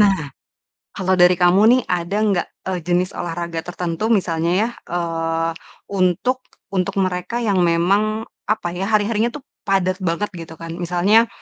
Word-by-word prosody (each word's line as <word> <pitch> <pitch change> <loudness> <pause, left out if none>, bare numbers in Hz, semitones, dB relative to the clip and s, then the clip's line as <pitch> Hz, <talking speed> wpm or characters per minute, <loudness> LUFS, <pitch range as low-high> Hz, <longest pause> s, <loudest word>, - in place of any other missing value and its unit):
Nah, 200 -2 +6 0.8
kalo 190 0 0
dari 180 0 +6
kamu 180 +2 +4 0.2
nih, 255 - +2
ada 180 +2 -1 0.2
gak, 175 - 0 0.2
eee, 185 -2 -2
jenis 180 +1 +1
olahraga 170 -1 -4
tertentu 175 +3 -3
misalnya 170 -6 +1
ya, 225 - +1 0.2
eee, 165 -1 -1 0.4
untuk 195 +7 +1 0.3
untuk 185 -2 0
mereka 180 +5 -3
yang 200 -4 +2
memang 205 +6 +1 0.2
apa 215 -4 0
ya, 190 +3 -3
hari-harinya 215 +1 +2
tuh 295 - -9 0.2
padat 185 -1 +1
banget 170 +5 -1
gitu 160 -1 -9
kan? 165 0 -7
Misalnya 185 +7 +3
180 Hz, 145 wpm, -20 LUFS, 170-205 Hz, 0.8 s, Nah